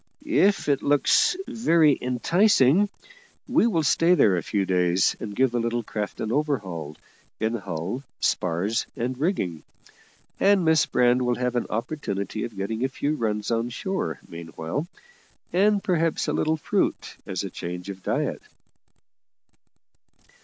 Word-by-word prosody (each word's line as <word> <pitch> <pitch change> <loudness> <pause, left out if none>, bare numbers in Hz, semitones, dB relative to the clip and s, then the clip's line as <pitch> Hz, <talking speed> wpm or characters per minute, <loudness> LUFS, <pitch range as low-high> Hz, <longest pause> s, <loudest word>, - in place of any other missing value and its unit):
If 205 - +2
it 140 -2 +2
looks 145 - +3
very 170 - +3
enticing, 165 - +3 0.6
we 230 - +3
will 170 -8 +1
stay 165 +5 +4
there 100 - +4
a 85 - -1
few 100 +5 -1
days, 90 -1 +2
and 105 -2 -6
give 130 +1 +2
the 120 - 0
little 115 0 -1
craft 105 -1 -5
an 110 - -2
overhaul 100 - -2 0.4
in 110 +1 0
hull, 95 +2 -4 0.2
spars, 90 +6 0
and 125 0 -2
rigging; 125 - -1 0.8
and 195 -3 +4
Miss 160 -1 +4
Brand 125 0 +3
will 125 -1 +1
have 125 0 -2
an 120 - -1
opportunity 110 - -3
of 110 -4 -9
getting 110 +5 -3
a 135 - +1
few 145 +3 -2
runs 105 -6 -2
on 115 +1 0
shore 120 - -3
meanwhile, 85 - -5 0.7
and 200 +2 +3
perhaps 165 -3 0
a - - 0
little 160 +1 +1
fruit - - -1
as - - -3
a - - -5
change 90 +1 -6
of 95 -1 -7
diet." - - -2
120 Hz, 145 wpm, -25 LUFS, 100-160 Hz, 0.8 s, stay